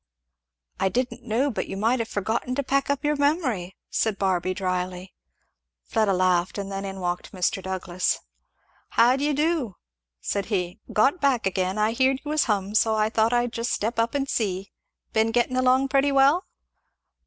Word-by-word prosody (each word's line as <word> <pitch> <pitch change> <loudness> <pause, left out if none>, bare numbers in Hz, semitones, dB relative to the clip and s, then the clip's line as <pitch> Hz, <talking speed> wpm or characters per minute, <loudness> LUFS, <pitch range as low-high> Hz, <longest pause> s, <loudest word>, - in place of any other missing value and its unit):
"I 190 - +2
didn't 250 +4 -2
know 250 +6 +1
but 220 - -3
you 195 - -5
might 230 +5 +1
have 230 - -2
forgotten 225 +4 -2
to 280 - -1
pack 275 +1 0
up 285 +1 -1
your 300 0 +2
memory," 275 - 0 0.2
said 220 -3 0
Barby 185 -2 0
dryly. 185 0 -3 0.7
Fleda 215 -3 +1
laughed; 185 0 +1
and 200 -1 -4
then 195 0 -4
in 195 0 -6
walked 175 +1 -3
Mr. 185 +1 0
Douglass. 185 -1 -1 0.7
"How 240 +2 +4
d'ye 290 +2 0
do?" 295 - 0 0.4
said 200 - -2
he. 180 -4 -2
"Got 275 +11 +2
back 275 -4 +2
again. 190 0 0
I 215 +1 +2
heerd 260 +3 +2
you 295 - -3
was 305 -1 +2
hum, 205 -5 0
and 210 +2 0
so 220 -1 +2
I 215 0 +1
thought 225 0 +2
I'd 240 -1 +1
just 230 0 -2
step 225 +2 -1
up 230 +4 0
and 275 -1 0
see. 195 -5 -2 0.4
Been 220 0 +3
getting 240 +2 +1
along 255 +1 +3
pretty 275 +1 +3
well?" 275 +6 +4
220 Hz, 180 wpm, -25 LUFS, 190-265 Hz, 0.7 s, How